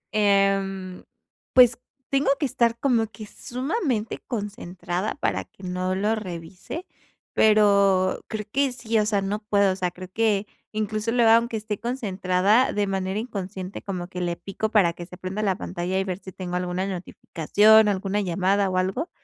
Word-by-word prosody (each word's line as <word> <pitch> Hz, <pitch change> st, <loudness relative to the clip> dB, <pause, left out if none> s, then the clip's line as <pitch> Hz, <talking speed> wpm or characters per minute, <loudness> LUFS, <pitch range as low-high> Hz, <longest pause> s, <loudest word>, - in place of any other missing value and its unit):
Em, 195 Hz, -2 st, +1 dB, 0.5 s
pues 245 Hz, -2 st, +6 dB, 0.3 s
tengo 275 Hz, 0 st, +2 dB
que 295 Hz, -, +1 dB
estar 235 Hz, -2 st, +1 dB
como 235 Hz, -5 st, +2 dB
que 220 Hz, 0 st, -10 dB
sumamente 250 Hz, -, -3 dB
concentrada 195 Hz, -4 st, -4 dB
para 95 Hz, -3 st, -1 dB
que 195 Hz, -, -20 dB
no 185 Hz, 0 st, -2 dB
lo 205 Hz, +3 st, +1 dB
revise, 185 Hz, -, -6 dB, 0.5 s
pero 200 Hz, -3 st, +4 dB
creo 215 Hz, -2 st, -4 dB
que 275 Hz, +1 st, +1 dB
sí, 230 Hz, -2 st, 0 dB
o 210 Hz, -, +1 dB
sea, 205 Hz, -3 st, +1 dB
no 205 Hz, +2 st, -2 dB
puedo, 200 Hz, -2 st, +2 dB
o -, -, -5 dB
sea, 185 Hz, -1 st, -1 dB
creo 180 Hz, +1 st, -10 dB
que 215 Hz, -3 st, +1 dB, 0.3 s
incluso 215 Hz, +1 st, -2 dB
luego 235 Hz, -2 st, +4 dB
aunque 230 Hz, 0 st, +3 dB
esté 210 Hz, -1 st, -4 dB
concentrada 205 Hz, -2 st, +1 dB
de 205 Hz, 0 st, +1 dB
manera 190 Hz, 0 st, -2 dB
inconsciente, 195 Hz, -4 st, -5 dB
como 180 Hz, -3 st, -5 dB
que 180 Hz, 0 st, -6 dB
le 175 Hz, -1 st, -1 dB
pico 200 Hz, +4 st, -4 dB
para 195 Hz, -6 st, +3 dB
que 175 Hz, 0 st, -9 dB
se 180 Hz, -, -11 dB
prenda 185 Hz, +3 st, -4 dB
la 195 Hz, -3 st, +1 dB
pantalla 180 Hz, +1 st, -3 dB
y 190 Hz, -, +1 dB
ver 190 Hz, -1 st, -4 dB
si 190 Hz, -, -10 dB
tengo 180 Hz, -1 st, -4 dB
alguna 180 Hz, +1 st, -2 dB
notificación, 200 Hz, +3 st, +3 dB
alguna 200 Hz, 0 st, 0 dB
llamada 195 Hz, +2 st, +1 dB
o 185 Hz, -, -1 dB
algo. 190 Hz, -, -1 dB
200 Hz, 170 wpm, -24 LUFS, 185-220 Hz, 0.5 s, pues